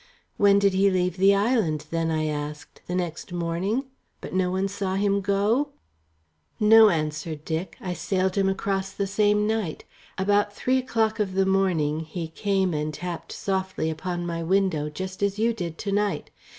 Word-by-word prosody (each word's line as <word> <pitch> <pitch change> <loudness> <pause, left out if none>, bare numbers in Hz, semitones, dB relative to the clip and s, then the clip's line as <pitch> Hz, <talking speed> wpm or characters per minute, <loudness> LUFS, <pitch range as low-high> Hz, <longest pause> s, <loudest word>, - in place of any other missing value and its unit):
"When 200 -1 +5
did 200 -1 +3
he 195 +1 +4
leave 180 -1 0
the 195 +2 +5
island, 200 - +1
then?" 165 -1 0
I 155 -1 0
asked. 150 0 -5
"The 180 - -2
next 175 -2 -3
morning? 175 +9 -1 0.3
But - - -8
no 185 -1 +1
one 190 +2 0
saw 195 -1 -3
him 200 0 +1
go?" 210 +9 +1 0.9
"No," 220 0 +8
answered 155 -2 -3
Dick. 165 +2 -3
"I 180 -2 -4
sailed 185 +1 0
him 195 -1 +2
across 195 0 -1
the 200 - -1
same 210 +1 +2
night. 215 -7 -2 0.3
About 205 +1 +1
three 260 +4 +1
o'clock 225 -3 0
of 190 -3 -1
the 195 0 +3
morning 180 -6 +1
he 160 +1 -5
came 190 +1 0
and 150 0 -1
tapped 170 +2 -6
softly 190 -4 -2
upon 175 +2 -4
my 170 -1 -3
window, 170 -4 +1
just 185 +5 -6
as 200 0 +1
you 230 +2 +2
did 170 -7 -5
to 200 - -3
night. 205 0 -1
190 Hz, 175 wpm, -25 LUFS, 165-200 Hz, 0.9 s, No